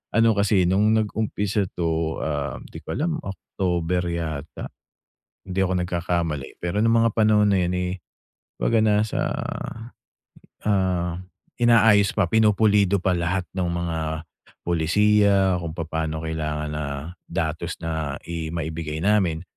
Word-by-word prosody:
ano 115 0 +5
kasi 100 -2 +3
nung 105 +5 +3
nag-umpisa 105 -2 0
to, 80 -1 -1
um, 75 -3 -3
di - - -8
ko - - -6
alam 160 +1 -1
October 90 -2 -2
yata? 80 -3 -4 0.6
Kung - - -73
hindi 95 +1 -2
ako 95 - -1
nagkakamali. 85 -5 -2
Pero 85 +3 -2
nung 115 0 +4
mga 115 - +4
panahon 105 -1 +4
na 100 - +3
'yon, 90 +1 -1
eh, 90 0 -1 0.6
'baga 115 - +2
nasa, 105 0 +2 1.4
ah, 90 -4 0 0.4
inaayos 115 -4 +5
pa 100 - +3
pinupulido 105 -2 +4
pa 95 - +2
lahat 90 +2 -1
ng 90 -2 0
mga 85 -1 -2 0.6
polisiya 95 +2 +3
kung 85 -2 -5
papaano 80 -1 -3
kailangan 75 -1 -3
na 75 0 -3 0.4
datos 85 0 -2
na 80 -3 -2 0.2
i 80 -1 -3
maibigay 80 -1 -4
namin. 95 -5 +2
90 Hz, 130 wpm, -24 LUFS, 80-105 Hz, 1.4 s, ano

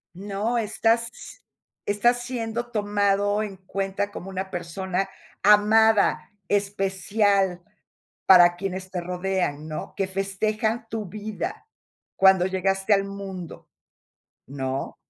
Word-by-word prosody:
No, 205 +5 -2
estás 225 +1 +2
s - - -12 0.5
estás 240 +4 +2
siendo 240 -1 -3
tomado 205 -1 +1
en 200 -2 -6
cuenta 195 +2 -3
como 195 -1 -8
una 190 0 -4
persona 180 +2 -3 0.4
amada, 210 +1 +4 0.2
especial, 195 -1 +1 0.6
para 175 -2 +7
quienes 185 0 -5
te 180 - -3
rodean, 180 -4 -2
¿no?, 155 - -6
que 195 - -1
festejan 215 +4 -1
tu 220 -2 -4
vida 215 - -6 0.5
cuando 190 -2 +5
llegaste 190 +2 +1
al 195 - +3
mundo, 195 -3 -8 0.8
¿no? 135 0 -4
195 Hz, 105 wpm, -25 LUFS, 190-210 Hz, 0.8 s, para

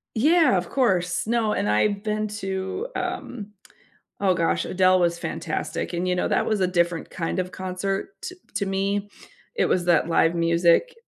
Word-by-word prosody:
Yeah, 305 - +4
of 175 - -4
course. 185 -9 +1
No, 225 -2 +1
and 105 - -1
I've 200 - +1
been 215 0 -1
to, 195 - -4
um, 210 -4 -5 0.7
oh 190 -2 +3
gosh, 165 -1 0
Adele 185 0 +3
was 170 -1 +1
fantastic, 175 - -4
and 175 +1 -1
you 180 - +1
know, - - 0
that - - +1
was 215 -2 0
a 185 - +3
different 175 -2 0
kind 170 +1 -3
of 185 0 -3
concert 190 - -3
to 365 0 -6 0.2
to 200 - 0
me. 200 +1 -1 0.5
It - - +2
was 175 -1 +1
that 170 -2 +3
live 165 0 +3
music. 170 - +3
190 Hz, 175 wpm, -24 LUFS, 175-210 Hz, 0.7 s, Yeah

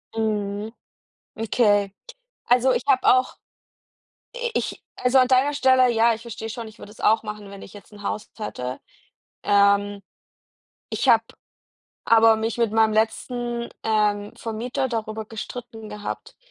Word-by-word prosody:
Mhm, 210 -1 -2 0.6
okay. 205 -3 +2 0.5
Also, 250 +1 +4
ich - - -1
habe 265 -2 +3
auch 255 0 +3 1.0
i-ich 485 -1 -3 0.2
also, 250 +1 +3
an 255 - +4
deiner 260 +3 +3
Stelle, 260 -2 +4
ja, 230 0 +4
ich 225 - -12
verstehe 225 -1 -7
schon, 230 0 -6
ich 215 - -15
würde 205 - -11
das 220 - -17
auch 220 +1 +3
machen, 210 -2 -7
wenn 200 0 -10
ich - - -12
jetzt 205 +1 -14
'n 205 0 -12
Haus 210 +1 -4
hätte. 125 - -5 0.6
Ähm. 200 0 +3 0.9
Ich 265 - 0
habe 225 -1 +6 0.8
aber 225 -1 +6
mich 225 +2 -2
mit 230 -3 +1
meinem 220 -1 +3
letzten, 235 +2 -1 0.2
ähm, 210 -2 +1
Vermieter 240 +4 -3
darüber 220 -2 -4
gestritten 225 0 -8
gehabt, 210 0 -7
220 Hz, 140 wpm, -23 LUFS, 210-240 Hz, 1.0 s, habe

